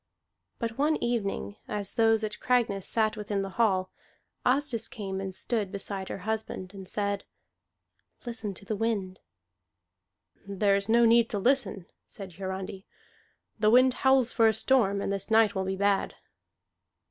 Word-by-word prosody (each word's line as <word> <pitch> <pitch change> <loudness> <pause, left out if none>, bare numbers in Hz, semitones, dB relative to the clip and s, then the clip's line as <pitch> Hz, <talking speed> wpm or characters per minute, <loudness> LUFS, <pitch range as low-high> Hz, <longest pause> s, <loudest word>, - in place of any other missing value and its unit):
But 230 +1 -4
one 305 +2 +3
evening, 220 -4 -2
as 200 -2 -4
those 225 -1 +3
at 210 0 -4
Cragness 230 -6 +1
sat 220 -1 +1
within 205 -2 -2
the 195 - -5
hall, 190 -4 +2 0.5
Asdis 250 -3 +1
came 195 -7 -5
and 190 -1 -5
stood 210 -4 0
beside 195 -1 -5
her - - -4
husband, 220 -4 -3
and 190 -2 -9
said, 200 -1 -2 1.0
"Listen 225 -4 -4
to 200 - -11
the 215 - -2
wind." 200 -4 -2 1.3
"There 200 0 +2
is 200 +1 -2
no 235 +1 +5
need 230 0 +5
to 210 - -2
listen," 235 -4 +1 0.2
said 195 -3 -8
Hiarandi. 190 0 -5 0.7
"The 215 -1 +4
wind 255 +2 +6
howls 265 -2 +4
for 225 -2 +5
a 220 - +4
storm, 200 -5 +2
and 200 - -1
this 195 +1 -4
night 220 -2 +4
will 190 -1 -2
be 190 0 -2
bad." 200 0 +1
210 Hz, 155 wpm, -28 LUFS, 195-230 Hz, 1.3 s, wind